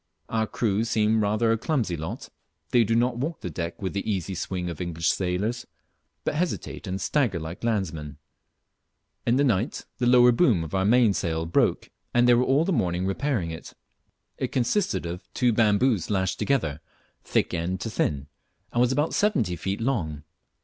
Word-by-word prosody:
Our 110 -1 0
crew 105 -1 0
seem 110 -1 +2
rather 110 +2 +2
a 115 - +1
clumsy 120 - 0
lot. 80 0 -6 0.4
They 120 - +5
do 115 +1 +1
not 120 +1 +2
walk 155 +6 -3
the 90 - -5
deck 85 +2 -4
with 95 - -2
the 100 +2 -2
easy 95 -1 -2
swing 90 0 -3
of 85 -2 -5
English 85 -1 -1
sailors, 100 +6 -2 0.6
but - - -1
hesitate 165 - -3
and 95 +1 -3
stagger 115 - +1
like 80 +5 -7
landsmen. 85 -10 -2 1.1
In 120 - +4
the 140 - +3
night 115 -2 0
the 120 - +1
lower 125 0 +7
boom 120 - +3
of 80 - -8
our 95 0 +1
mainsail 100 -8 +2
broke, 85 - +1 0.2
and 120 0 +5
they 120 - +7
were 120 +1 +4
all 140 +5 +3
the 190 - +1
morning 90 - 0
repairing 95 - -1
it. 80 - -9 0.6
It - - -2
consisted 175 - 0
of 85 +2 -7
two 125 -2 +3
bamboos 110 -2 +2
lashed 95 -2 0
together, 80 - 0 0.4
thick - - 0
end 90 +2 -2
to 115 - -3
thin, 70 -8 -1 0.5
and 120 - +2
was 125 0 +3
about 145 +4 0
seventy 140 - +1
feet 95 +4 -3
long. 85 - -1
105 Hz, 175 wpm, -26 LUFS, 90-120 Hz, 1.1 s, lower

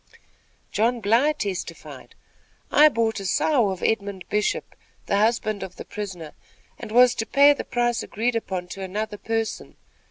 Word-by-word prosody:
John 235 +3 +1
Bly 230 +8 +3
testified: 200 -11 -6 0.6
"I 305 +1 +7
bought 225 -5 0
a 195 - -7
sow 245 -1 +2
of 190 -1 -5
Edmund 200 -4 -1
Bishop, 210 0 -1 0.3
the 200 - +1
husband 215 -1 +1
of 185 - -7
the - - -9
prisoner, 180 -7 -7 0.5
and - - -8
was 245 +1 +6
to 225 - -3
pay 285 +1 +6
the 285 - -5
price 240 -1 0
agreed 230 +3 -2
upon 185 -5 -3
to 195 - -7
another 205 +2 -4
person. 225 -1 -3
220 Hz, 155 wpm, -24 LUFS, 200-240 Hz, 0.6 s, I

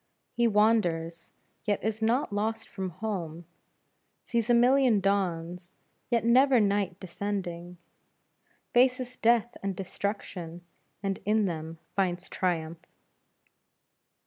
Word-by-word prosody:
He 235 0 +3
wanders 190 -7 +1 0.3
yet 205 -2 -1
is 220 0 -2
not 230 +1 +1
lost 220 +2 -2
from 190 -2 -4
home, 175 -3 -5 0.8
sees 235 -1 -1
a 240 - +6
million 250 -2 +5
dawns 180 -3 -1 0.3
yet 235 -1 +1
never 255 +2 +5
night 200 -3 +1
descending, 180 -2 -5 1.0
faces 250 0 +3
death 235 +1 +2
and 195 -1 -2
destruction 180 -3 -5 0.4
and 195 -1 -1
in 215 +1 +2
them 165 -2 -4 0.2
finds 180 -2 -1
triumph. 165 -2 -2
200 Hz, 105 wpm, -28 LUFS, 175-225 Hz, 1.0 s, a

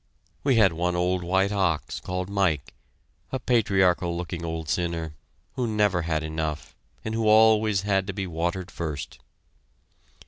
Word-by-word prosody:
We 135 -3 +3
had 100 -6 +5
one 90 +2 -1
old 90 +1 0
white 95 +3 +2
ox, 95 -6 0
called 90 0 -4
Mike, 95 -8 0 0.6
a 130 - -1
patriarchal 95 -8 +2
looking 85 -1 -5
old 80 -1 -4
sinner, 85 -1 -2 0.4
who 125 -2 -1
never 105 -5 +2
had 80 -2 -1
enough, 80 -1 -4 0.3
and 110 - -2
who 110 -1 0
always 110 -2 +5
had 95 -1 0
to 95 - -3
be 95 0 -3
watered 85 +1 -3
first. 80 -4 -5
90 Hz, 145 wpm, -26 LUFS, 85-105 Hz, 0.6 s, had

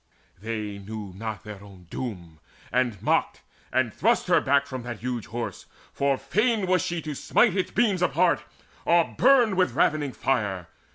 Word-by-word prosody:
They 105 -2 -4
knew 105 -1 -7
not 110 0 -5
their 105 -2 -9
own 95 -3 -14
doom, 85 -11 -6 0.3
And 120 -4 0
mocked, - - +1 0.3
and 120 -4 +1
thrust - - +2
her - - +5
back 140 +1 +3
from 130 -2 -6
that 120 -3 -7
huge 120 -3 -3
Horse 120 +1 -5 0.3
For 140 -1 +1
fain 225 - +1 0.2
she 175 - -2
was 165 - -4
to 155 - -4
smite 200 - +2
its 190 - 0
beams 205 -5 +1
apart, 170 -4 +2 0.4
Or 170 -1 +3
burn 245 -5 +5
with 185 -1 +2
ravening 145 -4 +1
fire. 100 -9 -1
130 Hz, 165 wpm, -26 LUFS, 105-170 Hz, 0.4 s, her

